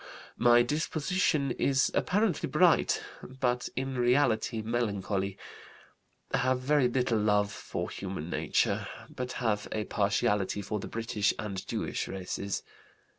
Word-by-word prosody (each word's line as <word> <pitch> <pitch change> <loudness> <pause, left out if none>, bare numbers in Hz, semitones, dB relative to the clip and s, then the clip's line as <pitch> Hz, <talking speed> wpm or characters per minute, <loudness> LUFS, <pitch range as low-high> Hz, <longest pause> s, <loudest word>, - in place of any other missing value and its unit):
"My 120 0 +6
disposition 155 +1 0
is 135 +2 +2
apparently 205 -3 +1
bright, - - +3 0.2
but 125 -1 -2
in 130 0 -2
reality 120 -3 +2
melancholy. 100 -4 -1 1.0
Have 130 -1 +2
very 140 0 +3
little 125 -2 +1
love 105 -1 +2
for - - -4
human 95 -5 -5
nature, - - 0 0.3
but 125 0 -4
have 105 -4 -1
a 110 - -1
partiality 100 -1 0
for 105 +2 -3
the - - -6
British 115 -2 0
and 100 -3 -4
Jewish - - -2
races. 95 +1 -4
120 Hz, 120 wpm, -30 LUFS, 105-130 Hz, 1.0 s, My